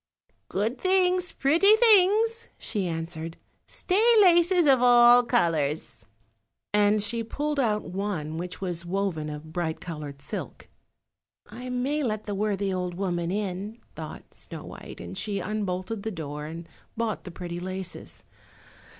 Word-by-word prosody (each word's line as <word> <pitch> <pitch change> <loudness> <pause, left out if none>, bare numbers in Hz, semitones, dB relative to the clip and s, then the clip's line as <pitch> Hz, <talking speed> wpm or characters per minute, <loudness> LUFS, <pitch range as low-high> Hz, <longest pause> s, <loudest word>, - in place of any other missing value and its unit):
"Good 220 +6 -1
things, 365 -2 +2
pretty 340 +10 +5
things," 445 +1 +4
she 200 -4 -2
answered; 165 0 -5 0.3
"stay 380 +3 0 0.2
laces 350 -2 +5
of 265 -3 +5
all 245 0 +7
colours," 165 - -1 0.7
and 210 0 +3
she 230 +2 -2
pulled 295 +6 -2
out 215 -5 +1
one 175 -5 -4
which 180 +1 -5
was 175 -3 -3
woven 175 -4 -2
of 150 +1 -8
bright 160 -2 -2
coloured 150 -4 -7
silk. 140 - -7 0.8
"I 245 +4 -9
may 260 +5 -1
let 215 -5 -2
the 205 - -4
worthy 200 -1 -1
old 180 -1 -3
woman 175 -3 -2
in," 200 +2 -3 0.2
thought - - -9
Snow - - -9
white, - - -10
and - - -8
she 205 -2 -3
unbolted 200 +1 -3
the 220 - -3
door 150 -5 -6
and 165 +1 -8 0.3
bought 225 -3 -2
the - - -8
pretty 175 0 -6
laces. 185 0 -6
205 Hz, 140 wpm, -26 LUFS, 175-250 Hz, 0.8 s, all